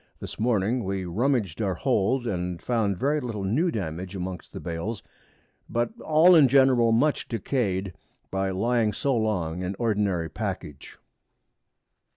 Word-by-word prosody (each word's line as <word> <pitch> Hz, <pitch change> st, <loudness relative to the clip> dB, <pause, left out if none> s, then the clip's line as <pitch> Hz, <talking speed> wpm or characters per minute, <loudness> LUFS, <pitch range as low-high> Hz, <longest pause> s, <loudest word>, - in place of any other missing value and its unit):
This -, -, -8 dB
Morning 115 Hz, +1 st, +1 dB
we 95 Hz, -1 st, -3 dB
rummaged 110 Hz, -, 0 dB
our 95 Hz, -4 st, 0 dB
Hold, 125 Hz, +2 st, +1 dB
and 90 Hz, -4 st, -3 dB
found 110 Hz, -4 st, 0 dB
very 145 Hz, +6 st, +1 dB
little 115 Hz, -7 st, -4 dB
new 130 Hz, -, +1 dB
Damage 90 Hz, -, -4 dB
amongst 95 Hz, -1 st, -6 dB
the -, -, -7 dB
Bails, 90 Hz, +6 st, -4 dB, 0.7 s
but 120 Hz, +6 st, 0 dB
all 160 Hz, +4 st, +5 dB
in 150 Hz, -4 st, +7 dB
general 130 Hz, -3 st, +4 dB
much 140 Hz, +7 st, +2 dB
decay'd 100 Hz, -5 st, -2 dB, 0.4 s
by 95 Hz, 0 st, -1 dB
lying 110 Hz, +3 st, +1 dB
so 140 Hz, -2 st, 0 dB
long 90 Hz, -7 st, -1 dB
in 95 Hz, +2 st, -3 dB
ordinary 100 Hz, -7 st, 0 dB
Package. 75 Hz, -1 st, -6 dB
105 Hz, 140 wpm, -26 LUFS, 95-125 Hz, 0.7 s, in